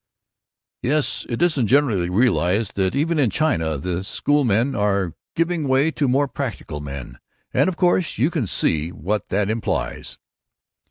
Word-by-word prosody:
"Yes. 145 +4 0
It 120 +6 0
isn't 150 -10 +2
generally 110 -9 +2
realized 100 -1 +1
that 95 +3 0
even 155 +3 +1
in 130 -5 +3
China 80 - 0
the 90 +4 -3
schoolmen 125 +1 +1
are 100 -5 0 0.2
giving 165 -2 0
way 135 +4 +3
to 145 -3 0
more 140 +3 +2
practical 115 - -5
men, 70 -4 -8 0.3
and - - +3
of 175 - -5
course 175 0 +1
you 135 +10 +2
can 140 - -1
see 80 -2 0
what 95 +3 -3
that 100 +1 +1
implies." 110 +1 -3
115 Hz, 150 wpm, -22 LUFS, 95-145 Hz, 0.3 s, in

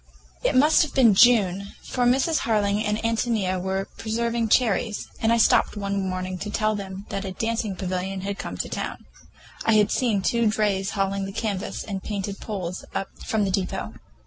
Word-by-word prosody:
It - - +1
must 300 +4 +6
have 310 -5 -1
been 255 -4 +6
in - - +5
June, 200 -3 +4
for 250 -1 -1
Mrs. 270 +6 +2
Harling 210 -2 +1
and 210 0 0
Ántonia 220 -5 0
were 190 +1 -2
preserving 230 +1 -1
cherries, 220 -2 +1
when 225 - +1
I 230 - +4
stopped 220 - +3
one 200 -1 -2
morning 185 0 -4
to 210 - -4
tell 215 +1 +1
them 195 -1 -6
that 195 - -3
a 190 -1 -5
dancing 225 -1 -2
pavilion 185 +1 -3
had 200 +1 -4
come - - -5
to - - -2
town. - - -5 0.6
I 225 - +3
had 210 -1 +4
seen 220 -6 +1
two 235 +3 +2
drays 205 -3 0
hauling 195 0 0
the 195 - -5
canvas 205 -2 -3
and 195 -3 -5
painted 200 -1 -4
poles 185 -4 -5
up 195 - -2 0.2
from 215 -2 +1
the 195 - -1
depot. 185 -1 -2
205 Hz, 190 wpm, -24 LUFS, 195-225 Hz, 0.6 s, must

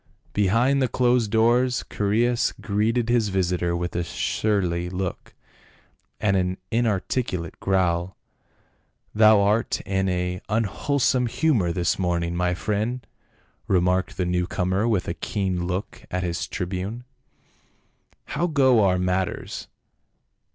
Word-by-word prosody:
Behind 115 +8 +2
the 130 - +3
closed 125 -3 +2
doors 120 +3 +2
Chaereas 115 +4 +1
greeted 110 +3 0
his 120 -3 +2
visitor 90 -2 0
with 85 0 -3
a 85 - 0
surly 90 -1 -1
look 95 0 -5 0.8
and 100 -2 +2
an 90 0 0
inarticulate 110 -5 -1
growl. 90 -2 0 0.5
" - - -43
Thou 110 -1 +6
art 105 +3 +1
in 95 0 -1
an 90 0 -2
unwholesome 125 +4 +1
humor 115 - +1
this 85 0 0
morning, 85 -2 0
my 90 0 0
friend," 110 +6 -2 0.6
remarked 90 0 +1
the 90 - 0
new 90 0 0
comer 95 +4 0
with 105 -6 0
a - - -1
keen 90 0 -2
look 95 +2 -4
at 90 0 -2
the 85 -1 -2
tribune. 95 +5 -4 0.6
" - - -40
How 170 +4 +1
go 130 -8 +4
our 90 -2 +3
matters 90 0 -2
95 Hz, 125 wpm, -24 LUFS, 90-115 Hz, 0.8 s, Thou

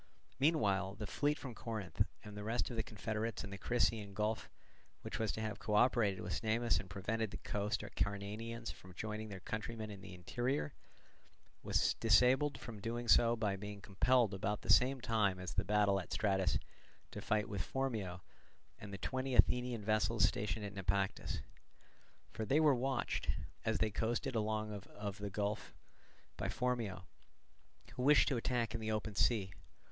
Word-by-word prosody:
Meanwhile 100 - +2
the 105 0 -4
fleet 145 +8 +1
from 130 -3 -7
Corinth 105 -8 -4 0.2
and 105 -1 -9
the 105 - -5
rest 115 +4 -1
of - - -4
the 110 - +1
confederates 110 +1 -3
in 100 - -7
the 100 - -5
Crissaean 110 -3 +1
Gulf, 110 +2 -1 0.5
which - - -4
was 110 -2 +1
to 110 - -4
have 110 -2 -3
co 105 - -1
operated 105 -4 +4
with 90 - -3
Cnemus 115 -2 +2
and 95 -1 -8
prevented 110 +4 -1
the - - -6
coast 105 -1 -2
Acarnanians 105 +4 -3
from 90 -1 -14
joining 110 +1 -4
their 95 -2 -7
countrymen 110 +1 -4
in 100 -2 -9
the 95 -1 -9
interior, 120 - -1 0.9
was - - +2
disabled 125 +6 +5
from 115 -3 -8
doing 115 +3 -3
so 115 0 +6
by 105 -4 0
being 105 +1 -7
compelled 110 +3 +3
about 100 +2 -1
the - - +2
same 130 +1 +4
time 110 -6 +2
as 90 -1 -5
the 95 - +1
battle 100 -1 +3
at 90 - -8
Stratus 95 -3 +2 0.5
to - - -6
fight 105 0 +1
with 100 -5 -3
Phormio 105 -6 -2 0.6
and 105 -2 -8
the 100 - -5
twenty 130 +6 -2
Athenian 125 -4 +3
vessels 110 +1 +2
stationed 105 0 -2
at 100 - -6
Naupactus. 95 0 -1 0.9
For 110 +1 -4
they 135 +8 +3
were 155 -3 +6
watched, 130 0 -1 0.3
as 110 -1 +1
they 110 +1 +1
coasted 115 +6 -1
along 110 -1 -1
out 100 -1 -7
of 105 0 -6
the 100 0 -3
gulf, 105 +2 -2 0.6
by - - -2
Phormio, 115 -7 -1 0.9
who 125 - -4
wished 145 +3 +6
to 135 - +1
attack 120 -1 0
in 115 - -3
the 110 0 -1
open 110 0 -2
sea. 100 -2 +2
110 Hz, 175 wpm, -36 LUFS, 100-115 Hz, 0.9 s, so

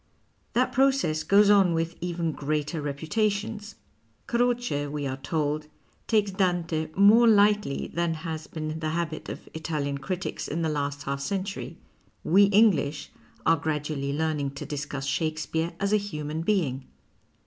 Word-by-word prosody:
That 255 +1 +2
process 265 - +2
goes 205 +3 +5
on 195 -4 +5
with 165 +1 -1
even 170 -2 -1
greater 150 +2 -2
reputations. 205 +8 -2 0.5
Croce, 240 -11 0
we 145 0 -4
are 135 -1 -3
told, 150 +1 -2 0.4
takes 210 -3 +2
Dante 175 -4 0
more 215 +5 +7
lightly 205 -7 +3
than 170 -1 0
has 160 -1 -5
been 155 0 -5
the 155 -1 -2
habit 165 -2 -3
of - - -8
Italian 150 -3 -3
critics 185 +5 -4
in 165 +3 -2
the 160 - +1
last 145 -1 -2
half 140 0 -3
century. 195 +6 -4 0.5
We 195 +5 +6
English 195 -8 +3 0.3
are 165 - +5
gradually 150 -2 -2
learning 145 -2 -1
to - - -6
discuss 140 -1 -4
Shakespeare 160 +3 -1
as 200 +1 0
a - - +6
human 155 -6 -4
being. 160 -9 0
160 Hz, 140 wpm, -27 LUFS, 150-200 Hz, 0.5 s, more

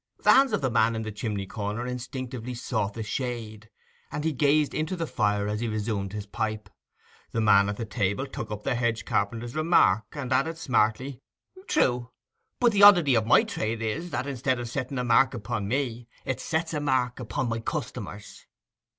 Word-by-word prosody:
The - - +7
hands 270 0 +5
of - - 0
the 130 -2 0
man 115 -1 +3
in 110 - -3
the 110 - -5
chimney 105 -2 -3
corner 105 +3 -4
instinctively 125 -1 -5
sought 110 -5 -2
the 115 - -4
shade, 110 -2 -5 0.4
and 145 0 -3
he 160 - +1
gazed 145 +2 +2
into 155 +4 -2
the 165 -2 -2
fire 105 -6 0
as 105 0 -2
he 120 - -2
resumed 105 -3 -2
his 105 -1 -5
pipe. 110 +1 -4 0.6
The 115 - 0
man 100 -2 +5
at 100 - -3
the 115 - -3
table 105 +3 -1
took 110 -5 -6
up 105 -1 -6
the 135 - 0
hedge 115 -2 -1
carpenter's 115 +4 -1
remark, 155 - +4
and 135 -3 -3
added 160 +5 +1
smartly, 125 -2 0 0.5
'True; 125 - +1 0.5
but 240 -2 +4
the 205 -1 +2
oddity 175 -9 +8
of 110 -2 +2
my - - +6
trade 110 +1 -3
is 160 +11 -3
that, 135 - -2
instead 130 -2 -1
of 120 - -4
setting 130 +2 -4
a 125 - 0
mark 125 +2 +4
upon 105 -2 -3
me, 120 -1 -2 0.2
it 130 - -2
sets 160 +1 -2
a 150 - 0
mark 130 -4 0
upon 120 +1 -2
my 115 0 -2
customers. 115 - -6
120 Hz, 195 wpm, -27 LUFS, 110-135 Hz, 0.6 s, oddity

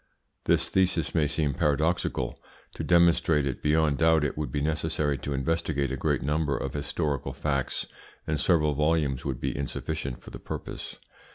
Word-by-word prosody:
This - - +3
thesis 90 -4 +1
may 80 -3 +3
seem 75 -2 0
paradoxical. 75 -4 0 0.3
To - - -5
demonstrate 85 -4 +4
it 65 -3 -3
beyond 75 -1 +2
doubt 80 -1 +4
it 75 - -1
would 75 -4 -3
be 75 - -1
necessary 75 -1 0
to 70 +3 -5
investigate 70 -1 0
a - - -1
great 65 - 0
number 75 0 0
of 70 - -4
historical 75 -1 -2
facts, 70 -3 -1 0.4
and 75 -1 -1
several 75 0 +3
volumes 75 -3 +1
would 65 -4 -2
be - - -2
insufficient 70 0 -3
for - - -11
the - - -8
purpose. - - -6
75 Hz, 165 wpm, -27 LUFS, 70-80 Hz, 0.4 s, demonstrate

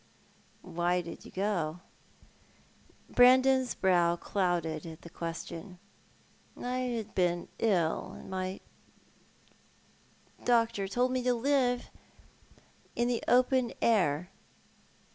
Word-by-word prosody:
"Why 175 +1 0
did 170 -1 -9
you - - -11
go?" 180 -4 -2 1.3
Brandon's 260 +1 +5
brow 175 -3 +3
clouded 175 -4 -1
at 160 -1 -10
the 170 - -11
question. 170 +2 -6 0.4
" - - -32
I 250 +1 -3
had 235 -4 -3
been 175 -1 0
ill, 185 -3 +1
and - - -12
my 185 0 -4 1.8
doctor 230 -4 +2
told 245 +5 +1
me 255 0 0
to 250 0 +2
live 245 -1 +1 1.0
iu 240 - +1
the 240 -1 0
open 255 0 +3
air." 180 -6 +2
200 Hz, 105 wpm, -30 LUFS, 175-245 Hz, 1.8 s, Brandon's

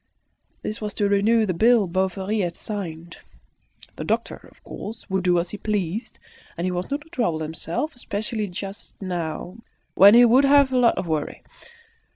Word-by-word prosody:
This 215 - -5
was 210 -1 -4
to 205 - +1
renew 215 +3 +3
the 185 - -1
bill 225 +3 +4
Bovary 190 +3 -1
had 175 -3 -1
signed. 170 -5 -6 0.8
The - - -4
doctor, - - -3
of - - -26
course, 220 +2 -8
would 190 -1 0
do 180 -1 +3
as 170 +1 -1
he 210 - -7
pleased; 205 0 -3 0.4
he 180 +2 -1
was 180 0 -3
not 285 +1 -2
to 310 - -18
trouble 225 - -1
himself, 165 - -4
especially 215 -2 -3
just 195 +2 -8
now, 175 0 -4 0.4
when 200 +3 +8
he 245 +1 +8
would 250 +4 +5
have 280 -1 +5
a 255 - +1
lot 235 -2 +4
of - - -2
worry. 155 -3 -3
200 Hz, 175 wpm, -23 LUFS, 175-225 Hz, 0.8 s, when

